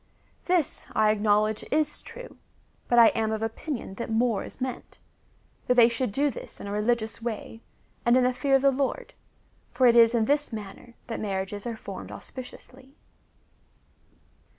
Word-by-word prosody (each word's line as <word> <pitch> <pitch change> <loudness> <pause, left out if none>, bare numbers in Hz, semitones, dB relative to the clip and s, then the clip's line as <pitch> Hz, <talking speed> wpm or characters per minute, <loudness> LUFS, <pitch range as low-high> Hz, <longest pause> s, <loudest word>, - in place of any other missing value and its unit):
This, 355 -5 0
I 215 -1 +4
acknowledge, 215 0 +1
is 300 0 0
true, - - -11 0.5
but 240 - +2
I 230 -1 +9
am 220 -1 -1
of 220 0 -2
oj)inion 225 -1 -5
that 235 - -4
more 225 -2 +1
is - - -10
meant 255 -1 -5 0.3
— - - -37
that 250 - +3
they 235 -1 +7
should 235 -1 -2
do 285 +6 +1
this - - -10
in - - -8
a 200 - -5
religious 220 +2 -1
way, 225 0 -5 0.4
and 240 +1 +4
in 255 - +4
the 250 0 +2
fear 275 +2 +2
of 270 - +2
the 275 - +6
Lord,* 280 - -2 0.6
for 260 - +2
it 240 -1 +6
is 230 0 +6
in 225 -2 +2
this 290 +4 +1
manner 215 +2 -9
that 230 - -5
marriages 200 +1 -3
are 230 -2 -4
formed - - -8
auspiciously. 260 +1 -11
235 Hz, 175 wpm, -26 LUFS, 220-260 Hz, 0.6 s, I